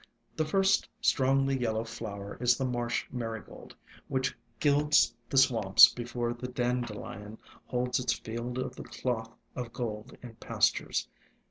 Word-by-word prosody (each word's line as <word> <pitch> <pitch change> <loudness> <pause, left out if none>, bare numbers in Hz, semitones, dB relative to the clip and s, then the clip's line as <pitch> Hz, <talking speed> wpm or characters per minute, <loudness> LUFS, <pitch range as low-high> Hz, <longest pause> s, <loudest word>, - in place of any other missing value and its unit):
The 155 - 0
first 195 +4 +2
strongly 135 +1 +2
yellow 110 -2 0
flower 105 -4 -7
is 125 0 +4
the 135 - -1
Marsh 120 -1 -1
Marigold, 115 -4 -6 0.3
which 130 -1 -1 0.2
gilds 150 0 +4 0.2
the 135 - -1
swamps 110 -7 +7
before 120 0 -3
the 120 +1 -6
Dan 125 0 0
delion 105 -1 -8 0.3
holds 125 0 0
its 125 - 0
field 120 +2 -5
of 130 0 -3
the - - -8
cloth 115 -3 -3 0.2
of 120 -2 -5
gold 115 0 -5
in 120 -2 -9
pastures. - - 0
120 Hz, 140 wpm, -30 LUFS, 115-130 Hz, 0.3 s, swamps